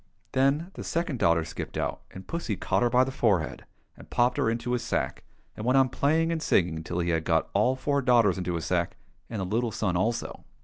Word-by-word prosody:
Then 140 Hz, +7 st, +1 dB
the -, -, -7 dB
second 165 Hz, -6 st, -2 dB
daughter 85 Hz, -3 st, +3 dB
skipped 80 Hz, -, -6 dB
out, -, -, -2 dB
and 95 Hz, -, -10 dB
pussy 165 Hz, -11 st, -3 dB
caught 95 Hz, +1 st, 0 dB
her 120 Hz, -, +3 dB
by 125 Hz, +2 st, +4 dB
the 135 Hz, -, -3 dB
forehead, 100 Hz, -, 0 dB, 0.3 s
and -, -, -15 dB
popped 120 Hz, +1 st, +2 dB
her -, -, +2 dB
into 115 Hz, +1 st, -2 dB
his 125 Hz, -1 st, 0 dB
sack, -, -, -2 dB, 0.3 s
and 105 Hz, -, -6 dB
went 125 Hz, +3 st, +3 dB
on 135 Hz, -1 st, +4 dB
playing 160 Hz, +6 st, +1 dB
and 165 Hz, -1 st, -1 dB
singing 85 Hz, -, +1 dB
till 85 Hz, -, -4 dB
he 85 Hz, 0 st, 0 dB
had 80 Hz, -1 st, 0 dB
got 80 Hz, -1 st, +1 dB
all 115 Hz, +6 st, +3 dB
four 140 Hz, +1 st, 0 dB
daughters 115 Hz, -7 st, +4 dB
into 90 Hz, -1 st, -2 dB
his 80 Hz, -, -3 dB
sack, 85 Hz, -1 st, -1 dB, 0.3 s
and 110 Hz, -, -4 dB
the 95 Hz, -, -1 dB
little 115 Hz, +5 st, 0 dB
son 95 Hz, -4 st, -1 dB
also. 110 Hz, +6 st, -1 dB
115 Hz, 225 wpm, -27 LUFS, 90-130 Hz, 0.3 s, by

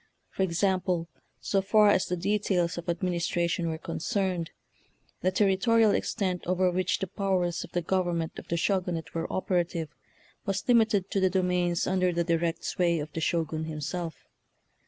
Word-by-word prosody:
For -, -, -4 dB
example, 180 Hz, -1 st, +1 dB, 0.3 s
so 195 Hz, -, +1 dB
far 210 Hz, +2 st, +5 dB
as 185 Hz, -, +2 dB
the 180 Hz, -, -1 dB
de 200 Hz, +4 st, +1 dB
tails 180 Hz, -4 st, 0 dB
of 170 Hz, 0 st, -6 dB
administration 170 Hz, 0 st, 0 dB
were 160 Hz, -, -3 dB
concerned, 180 Hz, 0 st, -2 dB, 0.7 s
the 185 Hz, -, +2 dB
territorial 210 Hz, +3 st, +3 dB
extent 185 Hz, -5 st, -1 dB
over 185 Hz, 0 st, +2 dB
which 185 Hz, +1 st, 0 dB
the -, -, -2 dB
powers 185 Hz, -3 st, -1 dB
of -, -, -12 dB
the 175 Hz, -1 st, 0 dB
government 175 Hz, -2 st, -1 dB
of -, -, -13 dB
the 170 Hz, -, -1 dB
Sho 190 Hz, +2 st, +2 dB
gunate 170 Hz, -3 st, -5 dB
were 165 Hz, 0 st, -3 dB
operative 175 Hz, -4 st, -1 dB, 0.5 s
was 195 Hz, -1 st, -2 dB
limited 220 Hz, -6 st, +3 dB
to 195 Hz, -, +1 dB
the 190 Hz, -1 st, +3 dB
domains 180 Hz, -2 st, +1 dB
under 185 Hz, -1 st, +2 dB
the 170 Hz, 0 st, 0 dB
direct 165 Hz, 0 st, 0 dB
sway 170 Hz, -2 st, +1 dB
of 150 Hz, 0 st, -5 dB
the 165 Hz, -, -3 dB
Shogun 160 Hz, -1 st, -1 dB
himself. 160 Hz, +1 st, -5 dB
180 Hz, 165 wpm, -28 LUFS, 170-190 Hz, 0.7 s, far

